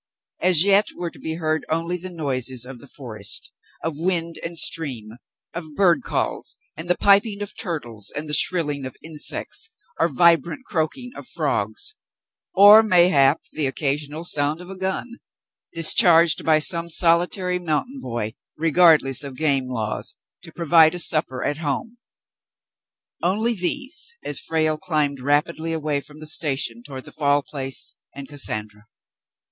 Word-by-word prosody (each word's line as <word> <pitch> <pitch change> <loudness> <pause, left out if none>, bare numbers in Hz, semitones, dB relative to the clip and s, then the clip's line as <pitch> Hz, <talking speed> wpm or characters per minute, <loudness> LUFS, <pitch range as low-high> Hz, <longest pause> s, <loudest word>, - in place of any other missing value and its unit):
As 180 -3 +5
yet 200 +1 +3
were 175 -1 -5
to - - -17
be 160 0 -4
heard 155 -2 -2
only 165 +2 -1
the 180 +1 -7
noises 130 -7 -2
of 125 -1 -10
the 140 - -14
forest 110 -8 -3 0.2
— - - -31
of 160 -2 -4
wind 170 -1 0
and 170 0 -5
stream 130 -11 -1 0.2
— - - -67
of 160 -3 -8
bird 185 -4 +3
calls - - -4 0.2
and 165 +2 -9
the 180 - +2
piping 205 +1 +2
of 205 - -9
turtles 120 - -4
and 150 +1 -5
the 150 - -6
shrilling 150 -6 0
of 130 - -11
insects 160 - -3 0.3
or - - +3
vibrant 170 - +2
croaking 210 - -3
of - - -10
frogs 410 +1 -3 0.3
— - - -50
or 210 +2 +10
mayhap 170 -8 +3
the 150 -3 +1
occasional 145 +3 -3
sound 150 -1 -1
of 180 +1 -11
a - - -8
gun, 190 +6 -5 0.5
discharged 165 -1 +5
by 155 -1 +4
some 170 +2 +1
solitary 180 +2 +2
mountain 180 - -3
boy, 115 -3 -4 0.2
regardless 155 -4 +4
of 140 -2 -8
game 140 -4 +1
laws, 110 -4 -3 0.3
to - - -13
provide 165 0 +4
a - - -4
supper 155 -6 +1
at 145 - -1
home, 160 - -4 0.6
— - - -70 0.3
only 215 +7 0
these, 275 - -1
as 145 - 0
Frale 155 -1 -1
climbed 150 -5 -1
rapidly 150 +4 0
away 150 -3 -2
from 150 +1 -12
the 155 - -8
station 135 -7 +1
toward 130 0 -9
the - - -10
Fall 145 -1 +1
Place, 135 -2 -1 0.2
and 140 -1 -9
Cassandra. 110 -7 -2
160 Hz, 160 wpm, -22 LUFS, 140-180 Hz, 0.6 s, or